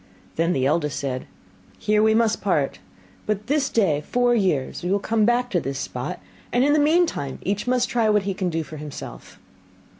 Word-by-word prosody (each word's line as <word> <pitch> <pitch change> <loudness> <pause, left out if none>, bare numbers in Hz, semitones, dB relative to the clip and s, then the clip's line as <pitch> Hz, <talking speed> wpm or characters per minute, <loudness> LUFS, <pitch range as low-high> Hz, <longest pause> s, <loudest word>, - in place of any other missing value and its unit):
Then 165 +2 +1
the 130 -1 0
eldest 150 0 +1
said, 130 -3 -3 0.5
'Here 210 0 +2
we 220 0 +4
must 225 -1 +2
part; 155 -9 0 0.5
but 210 0 -1
this 285 0 +1
day 170 -10 +2
four 245 0 +3
years 180 - 0
we 180 - -3
will 200 - +3
come 215 +1 +1
back 240 +1 +1
to 175 - +2
this 135 -3 -4
spot, - - -4 0.3
and 245 - +3
in 290 +1 +4
the 305 - +4
meantime 295 - +1
each 205 +4 -2
must 250 -1 +2
try 235 -4 +1
what 210 -1 +3
he 195 0 -1
can 185 -1 -2
do 165 -1 -2
for 155 0 -9
himself. 150 -1 -9
205 Hz, 200 wpm, -23 LUFS, 155-240 Hz, 0.5 s, we